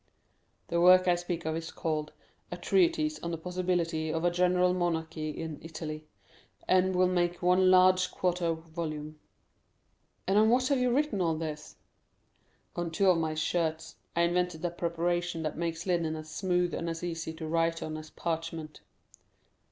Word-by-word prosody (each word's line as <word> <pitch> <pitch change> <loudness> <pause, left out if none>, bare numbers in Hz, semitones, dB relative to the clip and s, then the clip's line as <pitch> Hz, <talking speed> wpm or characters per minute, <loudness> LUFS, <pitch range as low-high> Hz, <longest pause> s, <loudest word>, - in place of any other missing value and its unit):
The 170 0 +1
work 185 +1 +7
I 180 - +5
speak 175 -1 -3
of 160 0 -1
is 165 0 -4
called 155 -2 -3 0.4
A - - -4
Treatise 330 -4 +2
on 170 - -4
the 165 - -3
Possibility 175 -2 -1
of 165 +2 -1
a 175 - +3
General 180 +1 +3
Monarchy 160 -3 -2
in 160 0 -6
Italy, 155 -1 -7 0.6
and 185 0 +3
will 185 0 +4
make 175 -1 0
one 185 +1 +4
large 185 0 +5
quarto 175 -2 0 0.2
volume." 155 -2 -5 1.1
"And 195 +2 +3
on 220 +1 +5
what 255 +2 +3
have 280 -2 +2
you 250 0 +2
written 275 -6 +1
all 165 -2 +1
this?" 155 -1 -6 1.0
"On 175 -1 -2
two 185 +3 +3
of 170 - +1
my 160 -1 -1
shirts. 160 0 -1 0.2
I 170 - +2
invented 175 -1 0
a 175 - 0
preparation 175 0 -1
that 155 - -3
makes 165 0 -3
linen 170 -4 0
as 155 0 -8
smooth 180 -1 0
and 170 - -2
as 165 +1 -5
easy 165 -2 -3
to 160 0 -6
write 165 +1 0
on 155 0 -4
as 155 0 -8
parchment." 165 -2 -4
170 Hz, 165 wpm, -30 LUFS, 160-180 Hz, 1.1 s, work